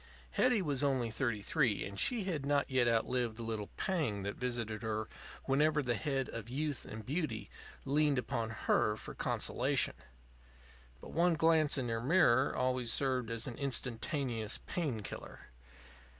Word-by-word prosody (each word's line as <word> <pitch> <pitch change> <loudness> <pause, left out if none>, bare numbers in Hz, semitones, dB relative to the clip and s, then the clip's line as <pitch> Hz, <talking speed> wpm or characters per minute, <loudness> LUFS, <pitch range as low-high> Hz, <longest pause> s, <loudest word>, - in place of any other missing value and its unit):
Hetty 245 -6 +3
was 145 -4 0
only 130 -5 +1
thirty 110 -3 0
three, 125 -6 +2
and 100 0 -6
she 235 - +1
had 170 -7 -2
not 140 0 +1
yet 130 -2 +3
outlived 115 0 +1
the 115 - -5
little 110 -2 -3
pang 135 - 0
that 100 +1 -3
visited 120 -4 -2
her 110 -1 -2 0.4
whenever 150 +2 +3
the 120 -2 +1
head 135 0 -1
of 115 0 -6
youth 145 +1 -1
and 110 0 -7
beauty 155 +4 -2 0.3
leaned 145 0 +3
upon 115 -2 -1 0.2
her 105 - +3
for - - -8
consolation. - - +1 1.1
But - - -9
one 170 +1 +3
glance 160 -2 +3
in 130 -2 -1
her 115 0 -1
mirror 135 -3 +4
always 125 -2 +1
served 130 -3 +1
as 115 0 -3
an 120 -3 -6
instantaneous 125 -3 -2
pain 145 -11 -2
killer. 80 - -9
130 Hz, 155 wpm, -34 LUFS, 115-150 Hz, 1.1 s, mirror